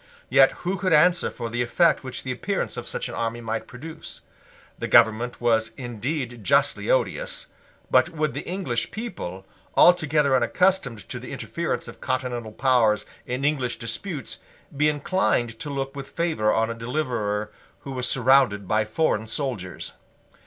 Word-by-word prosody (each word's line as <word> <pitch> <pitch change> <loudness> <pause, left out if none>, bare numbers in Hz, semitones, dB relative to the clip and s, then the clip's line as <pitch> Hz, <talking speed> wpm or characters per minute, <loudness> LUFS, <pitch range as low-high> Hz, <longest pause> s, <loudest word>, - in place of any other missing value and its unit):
Yet 135 0 +7
who 190 +2 0
could 185 -3 +1
answer 175 +4 +4
for 115 - -5
the 120 +1 -1
effect 165 +8 +3
which 130 -2 -5
the 130 - -3
appearance 190 +10 -2
of - - -6
such - - -3
an - - -7
army 115 0 -2
might 115 -1 -4
produce? 155 +6 -8 0.6
The - - -2
government 115 +1 +4
was 115 -2 +2
indeed 120 0 -4
justly 140 - +2
odious. - - +1 0.5
But - - +5
would 155 -3 -1
the - - -3
English 175 -11 -1
people, 95 - -6 0.3
altogether 150 -5 +5
unaccustomed 125 - +1
to - - -5
the - - -9
interference - - -3
of - - -11
continental 125 -3 -2
powers 110 -4 +3 0.2
in 125 +3 -2
English 135 -5 0
disputes, 145 - -4 0.4
be 150 +2 +3
inclined 145 - 0
to 150 - -5
look 135 0 -3
with 140 -1 -7
favour 160 -11 +1
on 115 +1 +1
a - - -2
deliverer 115 -4 -2 0.3
who 135 - -7
was 125 -2 -1
surrounded 125 -6 +3
by 110 +2 +2
foreign 110 -2 0
soldiers? 110 -7 -3
130 Hz, 155 wpm, -25 LUFS, 115-150 Hz, 0.6 s, Yet